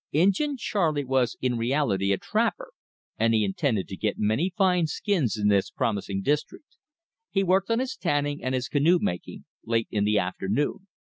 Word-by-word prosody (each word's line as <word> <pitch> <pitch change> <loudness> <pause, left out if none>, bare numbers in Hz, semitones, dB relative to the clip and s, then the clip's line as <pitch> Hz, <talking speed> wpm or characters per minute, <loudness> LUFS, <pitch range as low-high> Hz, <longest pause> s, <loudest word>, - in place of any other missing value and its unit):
Injin 200 - +2
Charley 160 - 0
was 130 -3 +1
in 125 -2 0
reality 115 -6 +1
a 100 - +2
trapper, - - -1 0.5
and 115 0 +3
he 110 -1 +3
intended 100 - -1
to 95 - -6
get 105 +2 -2
many 110 - +1
fine 180 -4 +3
skins 155 - 0
in 105 -1 +1
this 100 -2 +2
promising 100 -2 -2
district. 150 - -2 0.5
He 195 - +1
worked 190 +2 +2
on 230 - +2
his 260 +1 -2
tanning 145 -3 -1
and 130 0 -1
his 125 -1 -2
canoe 155 +5 +3
making 90 - -4 0.2
late 115 0 0
in 105 -2 0
the 105 0 +2
afternoon. 100 - -1
130 Hz, 170 wpm, -26 LUFS, 105-175 Hz, 0.5 s, and